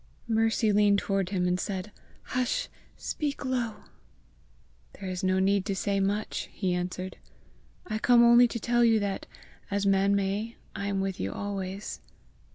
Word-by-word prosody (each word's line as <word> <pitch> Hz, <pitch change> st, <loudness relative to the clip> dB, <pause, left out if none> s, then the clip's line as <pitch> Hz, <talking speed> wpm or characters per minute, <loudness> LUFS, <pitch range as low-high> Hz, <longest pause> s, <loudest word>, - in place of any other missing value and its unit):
Mercy 225 Hz, -1 st, +2 dB
leaned 205 Hz, 0 st, +4 dB
toward 195 Hz, -2 st, 0 dB
him 180 Hz, -2 st, 0 dB
and 180 Hz, 0 st, +1 dB
said, 190 Hz, +2 st, -4 dB, 0.3 s
"Hush! 255 Hz, -1 st, -1 dB, 0.3 s
speak 290 Hz, -2 st, -3 dB
low." 245 Hz, -4 st, -2 dB, 1.1 s
"There 195 Hz, -, -8 dB
is 185 Hz, 0 st, -4 dB
no 185 Hz, 0 st, +2 dB
need 195 Hz, +1 st, +3 dB
to 200 Hz, -2 st, -1 dB
say 200 Hz, +1 st, 0 dB
much," 205 Hz, +2 st, -1 dB
he 185 Hz, -3 st, -1 dB
answered. 180 Hz, +1 st, -3 dB, 0.7 s
"I 215 Hz, 0 st, -3 dB
come 240 Hz, +1 st, +6 dB
only 240 Hz, +1 st, +7 dB
to 235 Hz, -, -4 dB
tell 240 Hz, +2 st, +2 dB
you 225 Hz, -2 st, +5 dB
that, 200 Hz, -1 st, -3 dB, 0.4 s
as 200 Hz, 0 st, 0 dB
man 195 Hz, 0 st, +3 dB
may, 200 Hz, +4 st, -1 dB, 0.2 s
I 200 Hz, -, -3 dB
am 195 Hz, -1 st, 0 dB
with 195 Hz, -1 st, -3 dB
you 95 Hz, -, -2 dB
always." 195 Hz, 0 st, -5 dB
200 Hz, 160 wpm, -28 LUFS, 190-225 Hz, 1.1 s, only